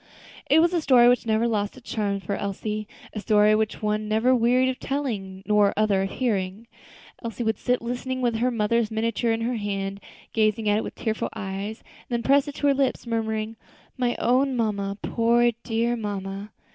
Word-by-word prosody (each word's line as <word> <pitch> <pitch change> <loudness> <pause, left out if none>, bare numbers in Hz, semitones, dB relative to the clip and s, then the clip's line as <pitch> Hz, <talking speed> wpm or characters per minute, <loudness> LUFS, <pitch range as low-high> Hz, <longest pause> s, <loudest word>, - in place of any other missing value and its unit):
It 310 +3 +6
was 345 +1 +2
a 340 - +1
story 250 -5 +6
which 245 -1 +3
never 220 +1 +2
lost 210 0 -1
its 250 - -15
charm 200 -2 -1
for 200 - -3
Elsie; 210 +2 -3 0.3
a 215 - -4
story 210 0 +4
which 215 0 +1
the - - -3
one 210 0 0
never 220 +4 +3
wearied 250 +1 +3
of 260 - -4
telling, 205 -9 -3
nor 210 -1 +4
the 200 - -2
other 205 -3 +3
of 195 - -1
hearing. 205 -3 -2 0.6
Elsie 230 +1 -4
would 220 -2 0
sit 250 -1 0
listening, 250 +2 -3
with 240 -3 0
her 245 +3 +2
mother's 230 -1 +1
miniature 230 +1 0
in 225 0 -1
her 240 +1 -1
hand, 200 -1 -3 0.3
gazing 215 0 +1
at 205 0 +3
it - - -3
with - - -7
tearful 220 -2 -2
eyes, 205 +1 -5 0.3
then 235 -1 -1
press 280 +3 +4
it 290 - -6
to - - -3
her 285 - +5
lips, 270 -2 0
murmuring, 220 -1 -2 0.4
"My 245 -2 0
own 255 +2 +2
mamma; 200 -3 -1
poor, 235 +1 +3
dear 235 +1 0
mamma." 200 -2 -5
225 Hz, 195 wpm, -25 LUFS, 210-245 Hz, 0.6 s, It